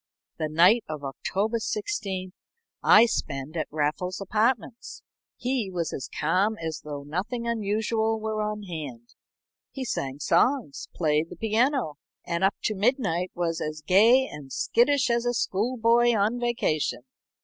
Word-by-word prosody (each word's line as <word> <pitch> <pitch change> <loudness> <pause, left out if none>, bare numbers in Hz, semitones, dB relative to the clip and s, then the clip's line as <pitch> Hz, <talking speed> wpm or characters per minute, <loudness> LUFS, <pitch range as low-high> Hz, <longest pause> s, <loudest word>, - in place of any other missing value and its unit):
The 155 - -1
night 180 +9 +5
of 155 -2 -5
October 200 - -2
16th 205 - -3 0.5
I 215 +3 +7
spend 140 - -3
at 155 - -2
Raffles's 155 +5 -2
apartments. 225 +4 -1 0.3
He 250 -5 -1
was 170 -3 -2
as 130 - -5
calm 190 +8 +1
as 160 -2 -5
though 145 -2 -6
nothing 200 - -3
unusual 220 0 0
were 215 0 -2
on 210 0 -3
hand. 145 -10 -7 0.6
He 265 -2 -6
sang 135 - -3
songs, 245 - +1
played 155 -1 +1
the - - -9
piano, 225 - 0 0.3
and 170 +2 -2
up 195 +1 +3
to 215 - +1
midnight 200 - 0
was 170 -2 -1
as 155 0 -4
gay 230 +8 +6
and 140 -3 -10
skittish 260 - +2
as 235 0 +1
a 245 - 0
school 235 +3 -1
boy 235 0 +4
on 215 +4 +1
vacation. 230 - -1
205 Hz, 145 wpm, -26 LUFS, 160-235 Hz, 0.6 s, I